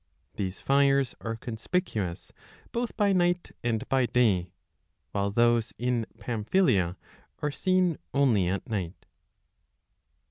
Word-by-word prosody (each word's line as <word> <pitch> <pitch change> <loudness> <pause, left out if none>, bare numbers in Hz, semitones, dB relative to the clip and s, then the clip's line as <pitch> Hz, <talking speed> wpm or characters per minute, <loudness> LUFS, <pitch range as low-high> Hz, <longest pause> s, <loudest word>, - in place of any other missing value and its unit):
These 95 -1 -4
fires 140 -2 +3
5 - - -7
are 115 - -1
conspicuous 110 - -3 0.4
both 240 0 -3
by 205 -2 +3
night 175 -1 +1
and 115 -2 -1
by 130 -2 +2
day, 100 -9 +2 0.6
while 100 0 0
those 120 +2 +2
in 120 -2 0
Pamphylia 105 - +1 0.5
are 150 - +1
seen 185 0 +1
only 120 -10 +3
at 95 +2 -2
night. 95 -5 -4
120 Hz, 115 wpm, -28 LUFS, 105-140 Hz, 0.6 s, fires